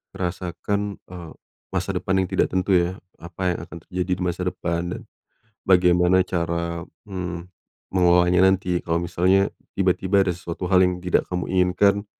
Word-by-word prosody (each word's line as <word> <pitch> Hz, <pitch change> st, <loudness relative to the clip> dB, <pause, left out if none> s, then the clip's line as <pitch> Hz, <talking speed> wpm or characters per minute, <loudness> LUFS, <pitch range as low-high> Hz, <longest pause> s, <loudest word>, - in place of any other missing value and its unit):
merasakan, 95 Hz, +3 st, -3 dB, 0.2 s
eee, 85 Hz, -3 st, -9 dB, 0.4 s
masa -, -, -1 dB
depan 95 Hz, -, -1 dB
yang -, -, -3 dB
tidak -, -, +2 dB
tentu 95 Hz, +1 st, -1 dB
ya, 90 Hz, 0 st, +3 dB, 0.2 s
apa 90 Hz, +2 st, -3 dB
yang -, -, -3 dB
akan 85 Hz, -1 st, -11 dB
terjadi 90 Hz, 0 st, -3 dB
di 90 Hz, -, -4 dB
masa 90 Hz, +1 st, -2 dB
depan 85 Hz, -1 st, -2 dB
dan 115 Hz, -, -8 dB, 0.7 s
bagaimana 90 Hz, 0 st, +4 dB
cara, 85 Hz, -1 st, -2 dB, 0.2 s
mmm, 90 Hz, -2 st, -5 dB, 0.4 s
mengolahnya 90 Hz, 0 st, +4 dB
nanti 90 Hz, -2 st, +1 dB
kalo 85 Hz, 0 st, 0 dB
misalnya 95 Hz, +3 st, +2 dB, 0.2 s
tiba-tiba 95 Hz, +1 st, +2 dB
ada 95 Hz, -, 0 dB
sesuatu 85 Hz, +1 st, -5 dB
hal 95 Hz, -, +5 dB
yang 90 Hz, 0 st, -1 dB
tidak 90 Hz, -, +1 dB
kamu 90 Hz, -1 st, -3 dB
inginkan 95 Hz, +3 st, +2 dB
90 Hz, 155 wpm, -23 LUFS, 85-95 Hz, 0.7 s, hal